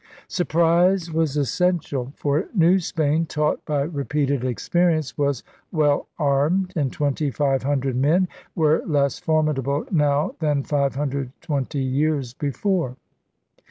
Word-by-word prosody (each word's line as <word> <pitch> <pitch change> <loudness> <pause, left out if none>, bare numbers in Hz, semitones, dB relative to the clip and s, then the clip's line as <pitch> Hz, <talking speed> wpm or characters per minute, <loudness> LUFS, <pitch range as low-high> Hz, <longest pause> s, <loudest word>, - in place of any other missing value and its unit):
Surprise 170 +1 +2
was 160 -3 0
essential; 145 -3 0
for 145 +5 0
New 180 +1 +5
Spain, 160 -1 0
taught 150 0 -1
by 145 -2 0
repeated 140 -3 -1
experience, 155 +5 0
was 140 -4 0 0.3
well 150 -4 +2
armed; 155 +6 +1
and 140 -5 0
twenty 145 0 -1
five 135 -1 0
hundred 135 -2 -1
men 160 +8 +3 0.3
were 155 -1 +3
less 140 -4 +1
formidable 150 -3 0
now 150 -3 +2
than 150 -4 +1
five 140 -2 0
hundred 140 -2 -2
twenty 140 -1 -2
years 135 -1 0
before. 145 0 -1
145 Hz, 125 wpm, -23 LUFS, 140-165 Hz, 0.3 s, New